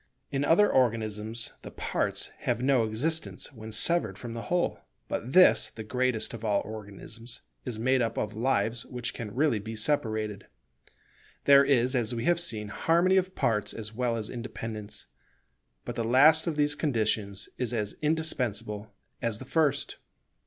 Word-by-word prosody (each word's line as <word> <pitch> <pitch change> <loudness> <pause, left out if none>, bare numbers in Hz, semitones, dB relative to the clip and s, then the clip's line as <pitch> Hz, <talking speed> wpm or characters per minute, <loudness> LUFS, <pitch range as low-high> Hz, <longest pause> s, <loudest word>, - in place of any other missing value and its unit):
In 140 0 0
other 175 +8 +5
organisms 110 -2 0
the - - -8
parts - - -1
have 120 0 -1
no 130 -4 +3
existence 145 +8 -2
when 110 -2 -9
severed 110 - +2
from 115 +1 -7
the 115 - -5
whole; 175 0 +1 0.3
but 125 +4 -4
this, 185 0 +6
the 110 - -8
greatest 125 0 0
of 115 -1 -7
all 105 -2 +2
organisms, 110 +2 -8 0.2
is 115 - -4
made 130 +3 +2
up 115 -1 -1
of 105 0 -2
lives 115 0 0
which 125 -2 -4
can 110 -4 -6
really 140 -5 +2
be 110 +2 -6
separated. 110 -5 -1 1.0
There 140 0 +8
is, 130 -2 +2
as 120 -1 0
we 115 +1 -3
have 175 -1 +4
seen, 110 -11 -2
harmony 170 - +3
of 185 0 0
parts 105 -3 0
as 110 -1 -6
well 120 0 0
as 110 -2 -3
independence, 115 -3 -6 0.8
but - - -4
the 115 - -2
last 145 +8 +5
of 165 - 0
these 145 0 +2
conditions 110 -8 -1
is 125 -2 -1
as 105 -4 -1
indispensable 115 -9 -1 0.3
as 115 -3 0
the 130 - -9
first. 145 0 0
115 Hz, 160 wpm, -28 LUFS, 110-140 Hz, 1.0 s, There